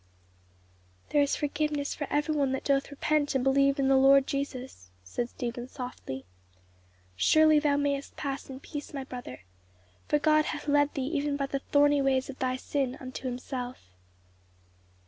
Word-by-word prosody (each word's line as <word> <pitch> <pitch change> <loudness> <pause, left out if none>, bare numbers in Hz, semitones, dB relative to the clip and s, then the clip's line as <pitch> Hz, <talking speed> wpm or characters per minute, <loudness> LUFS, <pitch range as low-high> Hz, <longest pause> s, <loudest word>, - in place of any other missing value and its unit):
"There 295 - +3
is 285 - +2
forgiveness 295 0 -1
for 290 - -4
every 295 +2 +1
one 280 -3 +1
that 265 - -3
doth 275 -1 +1
repent 290 0 0
and 260 - +2
believe 275 +1 +3
in 275 -1 +1
the 270 - +5
Lord 270 0 +6
Jesus," 260 - -5
said 235 - -3
Stephen 240 0 -5
softly. 250 - -7 0.9
"Surely 310 - +5
thou 295 -1 +2
mayest 285 -1 -1
pass 275 -1 -4
in 265 0 -8
peace, 290 -1 -7
my 275 - -3
brother; 245 - -8 0.7
for 295 - +3
God 305 0 +3
hath 295 - -4
led 290 0 +3
thee 270 - -1
even 290 -1 0
by 275 - 0
the 275 0 -3
thorny 290 +1 +3
ways 270 0 +1
of 265 - -15
thy 255 0 0
sin 265 0 -2
unto 260 0 -6
himself." 250 - -5
275 Hz, 165 wpm, -29 LUFS, 260-290 Hz, 0.9 s, Lord